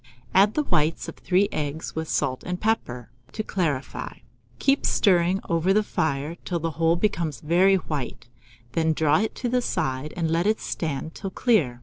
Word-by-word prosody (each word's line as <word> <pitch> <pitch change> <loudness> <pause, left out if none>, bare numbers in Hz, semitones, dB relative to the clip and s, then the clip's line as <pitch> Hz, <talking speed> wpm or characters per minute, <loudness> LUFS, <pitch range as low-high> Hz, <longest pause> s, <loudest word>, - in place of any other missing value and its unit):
Add 200 +3 +5
the 300 - +2
whites 155 - +1
of - - -6
3 190 +2 +2
eggs, 150 +1 -3
with 160 0 -3
salt 130 -3 0
and 180 0 -4
pepper, 125 - -1 0.2
to 215 - -3
clarify; 155 -10 -2 0.4
keep 275 +1 +2
stirring 180 -1 +3
over 170 +3 +2
the 215 +1 +3
fire, 155 -3 -2
till 175 - -2
the 165 0 -2
whole 165 +2 +2
becomes 170 - -1
very 180 +7 +4
white; 140 -9 -4 0.4
then 160 +3 +1
draw 155 0 +3
it 220 - -2
to 250 - -3
the 250 +1 +1
side, 150 - -2
and 165 -2 0
let 170 +4 +1
it 220 +1 +2
stand 160 0 -3
till 195 - -5
clear. 185 - +1
165 Hz, 180 wpm, -25 LUFS, 150-195 Hz, 0.4 s, Add